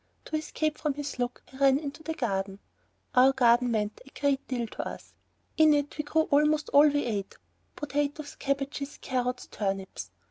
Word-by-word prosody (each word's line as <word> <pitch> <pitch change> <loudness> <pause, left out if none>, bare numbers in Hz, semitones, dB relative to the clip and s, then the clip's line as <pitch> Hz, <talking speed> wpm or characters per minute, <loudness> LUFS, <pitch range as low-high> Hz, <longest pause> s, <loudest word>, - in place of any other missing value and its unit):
To 315 - -4
escape 310 0 -2
from 300 -3 -1
his 285 -2 -5
look 245 0 -2
I - - -10
ran 275 -1 +5
into 290 +1 -6
the 320 0 -4
garden. 195 -8 -2 0.6
Our 260 +2 +6
garden 245 -1 +4
meant 215 -2 -1
a 275 - -14
great 280 -1 +1
deal 245 -3 -1
to 220 - -5
us. - - -9 0.4
In 310 -2 +6
it 290 0 -1
we 300 - -2
grew 315 +2 +2
almost 300 +1 +2
all 285 +1 +7
that 295 - +4
we 290 - +1
ate 205 -4 -3 0.4
potatoes, 290 +1 -2
cabbages, 275 +1 -3
carrots, 250 -1 -2
turnips. 195 -2 -3
275 Hz, 180 wpm, -28 LUFS, 245-295 Hz, 0.6 s, all